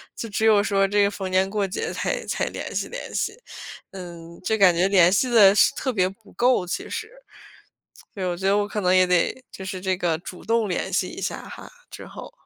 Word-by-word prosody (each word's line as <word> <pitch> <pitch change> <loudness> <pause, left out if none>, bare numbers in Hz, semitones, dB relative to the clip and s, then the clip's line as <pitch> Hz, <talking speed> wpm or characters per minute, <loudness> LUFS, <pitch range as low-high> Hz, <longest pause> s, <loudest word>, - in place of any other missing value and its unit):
就 230 - -5
只 220 +2 -1
有 210 -2 +5
说 195 -2 +2
这 205 +1 +2
个 200 - +2
逢 190 -2 -5
年 185 +1 +2
过 200 -1 -1
节， 185 - -4
才 - - -3
才 - - -1
联 - - -6
系 - - -1
联 - - -8
系。 425 +2 -2 0.5
嗯， 170 -3 -10
就 220 +3 0
感 185 -3 +6
觉 180 +3 +2
联 185 -3 +5
系 250 +5 +2
得 205 -5 +7
是 210 - +5
特 260 -3 -2
别 185 -2 +1
不 200 +2 -18
够 245 -6 +2
其 180 - -5
实。 445 - -4 1.1
对， 195 -4 -5
我 175 -1 -2
觉 190 +2 -4
得 200 - +3
我 205 0 +1
可 210 0 -4
能 180 -1 +2
也 185 0 +5
得 180 +8 0
就 190 - -8
是 190 -1 -5
这 185 -1 -1
个 170 -3 -1
主 180 +1 -10
动 225 -2 +1
联 180 - -3
系 - - 0
一 - - -8
下 - - -3
哈， - - -11 0.2
之 - - -10
后。 - - -10
195 Hz, 250 characters per minute, -23 LUFS, 180-215 Hz, 1.1 s, 得